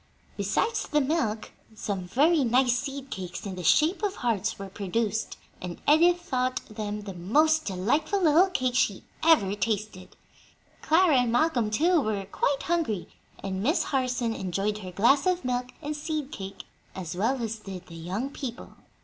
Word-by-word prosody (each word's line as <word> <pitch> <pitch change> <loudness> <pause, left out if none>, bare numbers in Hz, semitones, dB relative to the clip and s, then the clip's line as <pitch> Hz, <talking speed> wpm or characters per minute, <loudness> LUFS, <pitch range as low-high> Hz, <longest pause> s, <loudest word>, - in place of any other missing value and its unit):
Besides 450 -2 0
the 300 - +2
milk, 270 -7 -1 0.2
some 195 -3 -3
very 295 - +3
nice 245 +1 +3
seed 275 +1 -5
cakes 180 0 -6
in 195 - -4
the 180 -1 -6
shape 315 - +3
of 410 -2 -1
hearts 225 -4 -1
were 195 - -6
produced, 205 +3 -2 0.2
and 180 -1 -6
Edith 345 +4 +5
thought 255 -7 -1
them 210 -1 -5
the 200 -2 -7
most 305 - +2
delightful 255 - 0
little 345 +2 +5
cakes 255 -8 0
she - - 0 0.2
had 325 0 +7
ever 195 0 -2
tasted. 205 -3 -3 0.7
Clara 320 -2 +4
and 245 -2 +1
Malcolm, 245 -4 +2
too, 325 +9 +3
were 210 -5 -2
quite 275 +8 -1
hungry, 320 - -1 0.3
and 190 -1 -3
Miss 300 - +2
Harson 250 -4 -1
enjoyed 200 +2 -2
her 185 -3 -7
glass 270 - +3
of 365 -5 0
milk 250 0 -1 0.2
and 300 +1 -3
seed 300 -1 -3
cake 195 -6 -7 0.3
as 180 -3 -5
well 230 +8 0
as 225 -1 -3
did 190 -3 -8
the 170 - -13
young 190 +11 -4
people. 255 -5 -7
245 Hz, 165 wpm, -27 LUFS, 200-300 Hz, 0.7 s, had